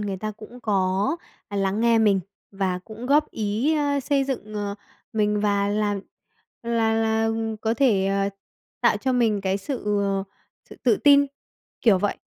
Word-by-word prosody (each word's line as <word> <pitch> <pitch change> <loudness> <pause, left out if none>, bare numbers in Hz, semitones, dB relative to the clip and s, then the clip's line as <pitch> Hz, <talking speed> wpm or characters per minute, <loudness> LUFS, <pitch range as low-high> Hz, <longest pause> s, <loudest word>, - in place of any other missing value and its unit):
người 200 -2 -3
ta 215 +3 -4
cũng 220 +4 -12
có, 195 - +1 0.3
à, 205 - -5
lắng 195 +2 0
nghe 230 -1 +4
mình 205 -3 +4 0.3
và 190 -2 -1
cũng 220 +6 -9
góp 295 +2 +3
ý, 220 +8 0
ơ, 285 -1 +1
xây 275 0 +1
dựng, 225 -6 -4
ờ, 205 -1 -3 0.4
mình 210 -1 +1
và 200 -1 +1
làm 205 -1 0 0.6
là 230 -1 +1
là 225 0 +1 0.3
có 225 +1 0
thể, 215 -8 +3
ờ, 195 0 +1 0.5
tạo - - +4
cho 260 -1 -1
mình 225 -5 +2
cái 195 0 0
sự, 255 +5 -5 0.2
ờ, 195 -1 0 0.5
sự - - -11
tự 230 -4 +4
tin, 285 -1 +6 0.5
kiểu 205 -6 +5
vậy. 205 +1 -1
215 Hz, 170 wpm, -24 LUFS, 200-235 Hz, 0.6 s, tin